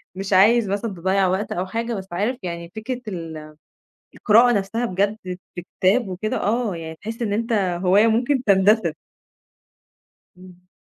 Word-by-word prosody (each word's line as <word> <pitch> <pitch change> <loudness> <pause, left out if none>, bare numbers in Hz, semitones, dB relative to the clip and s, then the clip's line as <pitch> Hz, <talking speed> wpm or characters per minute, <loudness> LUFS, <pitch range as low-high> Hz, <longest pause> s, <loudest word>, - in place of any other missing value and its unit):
مش 195 +1 -3
عايز 210 +2 +5
مثلًا 205 +2 -2
تضيّع 190 +2 +1
وقت 190 +3 -2
أو 180 +2 -2
حاجة، 230 +3 -3
بس 190 -2 -6
عارف 210 +8 -1
يعني 170 -1 -6
فكرة 245 +3 -5
ال 160 -5 -7 0.6
القراءة 235 +3 +5
نَفْسها 215 +3 -1
بجد 200 +2 0
في 180 -1 -8 0.2
كتاب 205 +3 +3
وكده، 190 +4 -3
آه 220 -3 0
يعني 160 -1 -7
تحس 225 +2 -5
إن 205 -3 -1
أنت 230 +3 -1
هواية 190 +1 +3
ممكن 245 +4 +1
تندثر. 195 -3 +3 1.4
إمم. 180 0 -17
200 Hz, 150 wpm, -22 LUFS, 180-225 Hz, 1.4 s, عايز